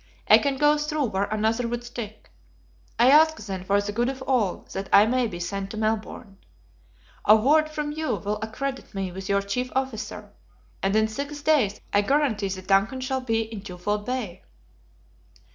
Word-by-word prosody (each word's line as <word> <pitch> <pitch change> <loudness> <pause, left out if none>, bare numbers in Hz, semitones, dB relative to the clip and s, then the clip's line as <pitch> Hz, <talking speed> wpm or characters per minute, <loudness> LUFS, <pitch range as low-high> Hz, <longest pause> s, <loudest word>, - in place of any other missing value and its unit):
I - - +8
can 280 -2 -1
go 295 +1 +4
through 300 -3 -1
where 195 +1 0
another 220 +3 0
would 240 +1 -4
stick. 235 -3 -8 0.7
I 245 +3 +6
ask 315 +2 +6
then, 195 -3 -6
for 200 +2 +2
the 205 0 -3
good 240 +4 0
of 265 -1 -6
all, 240 -9 0
that 195 0 -5
I 205 - +7
may 250 +1 +1
be 175 -5 -7
sent 195 +3 -4
to 215 - -7
Melbourne. 215 -1 -3 0.9
A 210 - +8
word 300 +8 +3
from 300 -1 -3
you 315 +1 -2
will 210 +1 -3
accredit 265 +3 -5
me 190 -2 -3
with 190 +1 -7
your 200 0 +2
chief 250 +6 -3
officer, 260 -4 -4 0.5
and 195 +1 +1
in 220 0 +3
six 285 +6 -6
days 270 -10 +2
I 205 - +5
guarantee 230 -5 +1
the 185 0 -5
DUNCAN 195 +7 +2
shall 260 0 -2
be 225 -3 0
in 220 -2 -6
Twofold 205 +3 -4
Bay." 230 -8 -4
220 Hz, 180 wpm, -25 LUFS, 200-265 Hz, 0.9 s, I